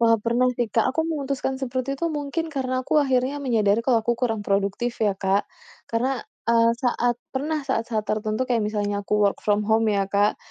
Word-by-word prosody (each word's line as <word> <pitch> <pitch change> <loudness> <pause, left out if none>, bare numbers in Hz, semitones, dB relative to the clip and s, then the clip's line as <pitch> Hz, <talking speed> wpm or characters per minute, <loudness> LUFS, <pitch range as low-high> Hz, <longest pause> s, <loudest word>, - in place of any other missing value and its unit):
Wah, 230 -1 +5
pernah 240 +2 +2
sih 240 -2 0
Kak 225 +1 +2
aku 320 - 0
memutuskan 275 -3 -2
seperti 260 +2 -2
itu 335 - -1
mungkin 295 +3 -2
karena 255 -1 -1
aku 305 - +3
akhirnya 265 +1 +1
menyadari 225 -5 +2
kalau 235 -1 +3
aku 240 - +2
kurang 225 -4 0
produktif 200 +4 0
ya 210 -2 +3
Kak. 195 +1 0 0.4
Karena, 245 +2 0 0.3
eee, 230 0 +5
saat 245 -1 0 0.2
pernah 300 +3 -1
saat-saat 225 -3 -1
tertentu 215 +3 -1
kayak 235 -2 +2
misalnya 205 -1 -1
aku 210 - 0
work 200 - +1
from 210 0 +1
home 220 +1 +2
ya 200 -2 +2
Kak, 205 +1 +2
235 Hz, 190 wpm, -24 LUFS, 215-265 Hz, 0.4 s, Wah